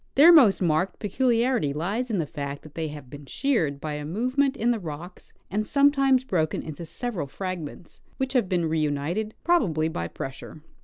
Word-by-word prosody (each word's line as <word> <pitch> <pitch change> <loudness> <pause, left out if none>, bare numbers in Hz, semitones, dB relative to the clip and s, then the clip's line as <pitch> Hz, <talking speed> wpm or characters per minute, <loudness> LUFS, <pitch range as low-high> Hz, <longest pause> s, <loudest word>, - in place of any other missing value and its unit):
Their 310 +6 +9
most 230 - +6
marked 170 +3 +1
peculiarity 235 - +1
lies 200 - -2
in 215 - 0
the 165 - 0
fact 140 -1 -6
that 155 - -13
they 160 -1 -3
have 145 -3 -9
been 145 -1 -10
sheared 165 - 0
by 155 +1 -4
a 150 0 -4
movement 255 - 0
in 235 +2 +2
the 235 - -1
rocks 170 +1 -9 0.2
and 215 +2 -1
sometimes 275 -2 +4
broken 165 -11 -1
into 160 +1 -7
several 210 - -4
fragments 175 0 -7 0.2
which 265 0 -2
have 240 -8 +2
been 175 -2 +1
reunited, 160 +7 -1
probably 170 - +2
by 85 - -3
pressure. 135 - -8
180 Hz, 175 wpm, -25 LUFS, 155-245 Hz, 0.2 s, Their